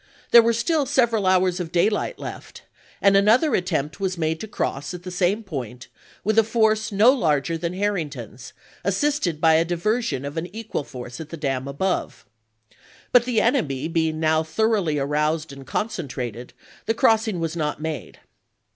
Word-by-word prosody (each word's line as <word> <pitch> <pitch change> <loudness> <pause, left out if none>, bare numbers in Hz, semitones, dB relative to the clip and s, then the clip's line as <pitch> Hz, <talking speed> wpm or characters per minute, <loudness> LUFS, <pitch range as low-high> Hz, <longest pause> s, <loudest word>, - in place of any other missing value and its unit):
There 235 - +10
were 230 +1 +2
still 280 +5 0
several 235 -7 +2
hours 185 -1 +3
of 170 -2 -4
daylight 210 - +1
left, - - -9 0.4
and 200 0 +5
another 220 +10 +4
attempt 150 -5 -1
was 190 -2 -2
made 160 0 -1
to 220 - -6
cross 165 -5 -3
at 175 - -10
the 185 - -6
same 185 +5 0
point 125 - -7 0.3
with 215 +2 +3
a - - +5
force 220 -1 +1
no 210 +5 +6
larger 155 - +1
than 170 +1 -3
Harrington's, 155 - -4 0.3
assisted 200 - 0
by 160 0 +5
a 160 +1 +4
diversion 175 - -1
of 145 +3 -6
an 165 +2 -2
equal 225 -8 -4
force 125 +2 -8
at 155 - -9
the 165 - -7
dam 135 -3 -2
above. 180 +7 -2 0.9
But 245 -1 +5
the 240 -4 +1
enemy 160 - 0
being 160 -1 0
now 160 0 +2
thoroughly 190 -2 0
aroused 150 +2 -1
and 135 -1 -12
concentrated, 130 - -4 0.3
the 225 - +1
crossing 220 -4 +2
was 165 0 -2
not 150 -3 -2
made. 155 -4 -5
175 Hz, 165 wpm, -23 LUFS, 150-220 Hz, 0.9 s, There